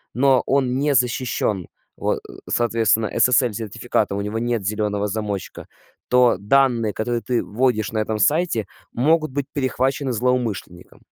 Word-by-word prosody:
но 130 Hz, 0 st, +4 dB
он 130 Hz, -2 st, +1 dB
не 145 Hz, -1 st, +1 dB
защищен, 120 Hz, -6 st, 0 dB, 0.3 s
вот, -, -, -1 dB
э, -, -, -12 dB, 0.2 s
соответственно, 115 Hz, -2 st, +2 dB
SSL-сертификата, 115 Hz, -5 st, +1 dB
у 100 Hz, -, -2 dB
него 105 Hz, +2 st, -3 dB
нет 120 Hz, -3 st, -1 dB
зеленого 105 Hz, 0 st, -1 dB
замочка, 105 Hz, -2 st, -5 dB, 0.4 s
то 125 Hz, -5 st, +4 dB
данные, 115 Hz, 0 st, +2 dB
которые 120 Hz, +1 st, -2 dB
ты 125 Hz, -2 st, -1 dB
вводишь 110 Hz, -2 st, 0 dB
на 110 Hz, -, -1 dB
этом 110 Hz, 0 st, -1 dB
сайте, 145 Hz, -, +1 dB, 0.3 s
могут 155 Hz, +4 st, +2 dB
быть 140 Hz, 0 st, -2 dB
перехвачены 135 Hz, 0 st, -1 dB
злоумышленником. 115 Hz, -7 st, -3 dB
120 Hz, 135 wpm, -21 LUFS, 105-130 Hz, 0.4 s, но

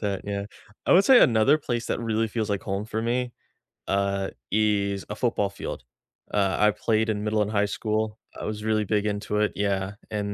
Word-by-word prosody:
that, 100 Hz, -3 st, -2 dB
yeah. 100 Hz, 0 st, -3 dB, 0.4 s
I -, -, +5 dB
would 190 Hz, +3 st, +6 dB
say 260 Hz, -2 st, +8 dB
another 115 Hz, +5 st, +5 dB
place 120 Hz, -5 st, -3 dB
that -, -, -1 dB
really 115 Hz, -1 st, 0 dB
feels 110 Hz, 0 st, -2 dB
like 100 Hz, -, -1 dB
home 100 Hz, +2 st, -3 dB
for 110 Hz, 0 st, -3 dB
me, 120 Hz, +2 st, -1 dB, 0.6 s
uh, 100 Hz, 0 st, 0 dB, 0.2 s
is 100 Hz, -2 st, +1 dB
a 105 Hz, -, -4 dB
football 110 Hz, -4 st, 0 dB
field. 100 Hz, -, -6 dB, 0.5 s
Uh, 100 Hz, -3 st, +2 dB
I 105 Hz, 0 st, +5 dB
played 110 Hz, +1 st, 0 dB
in 105 Hz, -1 st, -1 dB
middle 105 Hz, 0 st, +1 dB
and 105 Hz, -, -4 dB
high 105 Hz, -1 st, +2 dB
school, 110 Hz, +1 st, -2 dB, 0.2 s
I -, -, -5 dB
was 105 Hz, 0 st, -4 dB
really 110 Hz, -1 st, +1 dB
big 105 Hz, +1 st, 0 dB
into 105 Hz, 0 st, -2 dB
it, 105 Hz, -, +2 dB
yeah, 100 Hz, -1 st, -1 dB, 0.2 s
and 105 Hz, -1 st, -2 dB
105 Hz, 205 wpm, -26 LUFS, 100-110 Hz, 0.6 s, say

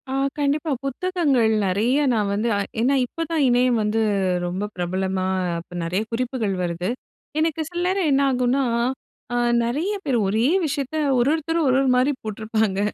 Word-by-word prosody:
ஆ -, -, -3 dB, 0.3 s
கண்டிப்பா. 295 Hz, +2 st, 0 dB
புத்தகங்கள் 275 Hz, -6 st, +1 dB
நெறைய 215 Hz, +8 st, +1 dB, 0.2 s
நான் 210 Hz, -3 st, 0 dB
வந்து 210 Hz, +3 st, 0 dB, 0.3 s
ஏன்னா 265 Hz, +4 st, +3 dB
இப்போ 330 Hz, -, -8 dB
தான் 320 Hz, -3 st, +2 dB
இணையம் 245 Hz, -1 st, +3 dB
வந்து 215 Hz, +2 st, 0 dB, 0.4 s
ரொம்ப 180 Hz, +3 st, -3 dB
பிரபலமா 185 Hz, +1 st, -1 dB, 0.3 s
அப்ப 175 Hz, +1 st, -12 dB
நெறைய 180 Hz, +4 st, -1 dB
குறிப்புகள் 230 Hz, -4 st, -1 dB
வருது. 175 Hz, +1 st, -2 dB, 0.5 s
எனக்கு 320 Hz, 0 st, 0 dB
சில 345 Hz, 0 st, -4 dB
நேரம் 375 Hz, -3 st, +1 dB
என்ன 275 Hz, 0 st, +3 dB
ஆகும்னா, 255 Hz, +2 st, +1 dB, 0.7 s
அ -, -, 0 dB, 0.3 s
நிறைய 300 Hz, -, -1 dB
பேர் 265 Hz, -4 st, +1 dB
ஒரே 220 Hz, +5 st, +2 dB, 0.2 s
விஷயத்தை 285 Hz, +1 st, -2 dB, 0.2 s
ஒரொருத்தரும் 315 Hz, +5 st, +1 dB
ஒரு 255 Hz, 0 st, +3 dB
ஒரு 270 Hz, -, +2 dB
மாரி 255 Hz, +3 st, +3 dB
போட்டிருப்பாங்க. 215 Hz, -2 st, -1 dB
245 Hz, 150 wpm, -23 LUFS, 210-285 Hz, 0.7 s, ஏன்னா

